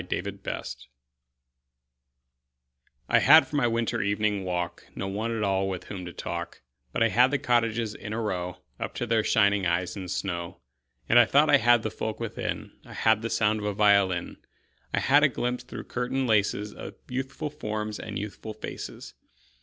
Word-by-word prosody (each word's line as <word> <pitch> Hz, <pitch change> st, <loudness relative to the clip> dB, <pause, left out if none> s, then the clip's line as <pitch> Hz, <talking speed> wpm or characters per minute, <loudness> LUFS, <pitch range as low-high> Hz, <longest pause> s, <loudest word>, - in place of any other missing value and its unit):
Good -, -, -4 dB
Hours 65 Hz, 0 st, -5 dB, 2.2 s
I -, -, +4 dB
HAD 155 Hz, +4 st, +8 dB
for -, -, -6 dB
my 130 Hz, -4 st, +3 dB
winter 115 Hz, 0 st, 0 dB
evening 100 Hz, 0 st, 0 dB
walk 90 Hz, -1 st, -3 dB
No 95 Hz, -, -3 dB
one 105 Hz, +4 st, -2 dB
at 105 Hz, -, -1 dB
all 95 Hz, -1 st, +1 dB
with 95 Hz, -1 st, -4 dB
whom 95 Hz, -3 st, -7 dB
to 90 Hz, -, -6 dB
talk, -, -, -6 dB, 0.3 s
But -, -, +1 dB
I 115 Hz, -, +4 dB
had 125 Hz, +6 st, +5 dB
the 145 Hz, -, +1 dB
cottages 115 Hz, -4 st, +1 dB
in 105 Hz, -, -8 dB
a 110 Hz, -, -2 dB
row 90 Hz, -5 st, -3 dB, 0.2 s
Up -, -, -4 dB
to 120 Hz, -, -2 dB
their 115 Hz, -1 st, +2 dB
shining 100 Hz, -3 st, +3 dB
eyes 90 Hz, +1 st, 0 dB
in 95 Hz, -2 st, -6 dB
snow. 85 Hz, -2 st, -4 dB, 0.5 s
And 120 Hz, -, +6 dB
I 120 Hz, -, +7 dB
thought 145 Hz, +6 st, +4 dB
I 145 Hz, -, +8 dB
had 120 Hz, -3 st, +4 dB
the 110 Hz, -, -2 dB
folk 110 Hz, -1 st, -4 dB
within: 115 Hz, -2 st, -4 dB
I -, -, -12 dB
had 110 Hz, -1 st, +3 dB
the 115 Hz, -, -3 dB
sound 105 Hz, -1 st, +2 dB
of 105 Hz, -, -5 dB
a 105 Hz, -, -2 dB
violin; 100 Hz, -4 st, +3 dB, 0.5 s
I -, -, +1 dB
had 145 Hz, +2 st, +5 dB
a 150 Hz, -, +5 dB
glimpse 125 Hz, 0 st, -2 dB
through -, -, -7 dB
curtain 125 Hz, +2 st, -2 dB
laces 105 Hz, -2 st, +1 dB
Of -, -, -9 dB
youthful 135 Hz, +4 st, -4 dB
forms 110 Hz, -7 st, -4 dB
and 105 Hz, -2 st, -5 dB
youthful 105 Hz, +2 st, -6 dB
faces. -, -, -7 dB
110 Hz, 185 wpm, -27 LUFS, 100-120 Hz, 2.2 s, HAD